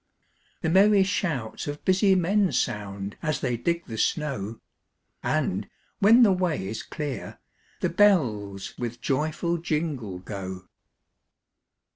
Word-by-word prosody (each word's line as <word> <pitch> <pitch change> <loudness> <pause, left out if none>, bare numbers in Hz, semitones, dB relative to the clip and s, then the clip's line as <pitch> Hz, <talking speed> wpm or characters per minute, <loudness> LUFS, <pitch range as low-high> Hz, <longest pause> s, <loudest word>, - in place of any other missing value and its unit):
The 160 - 0
merry 200 +2 +6
shouts 160 - -2
of 145 0 -6
busy 190 +1 +4
men 190 +2 +2
Sound, 100 -3 -2
as 155 -5 -1
they 125 -3 0
dig 170 +8 -1
the 110 -3 -6
snow; 115 -9 -1 0.6
And, - - -1 0.3
when 225 +5 +7
the 210 - +6
way 180 - 0
is 110 +3 -4
clear, 145 -3 -5 0.4
the - - +1
bells 115 - +2
With 120 -1 -4
joyful 155 +5 -1
jingle, 150 - -2
go. 95 -1 -7
150 Hz, 120 wpm, -26 LUFS, 110-180 Hz, 0.6 s, when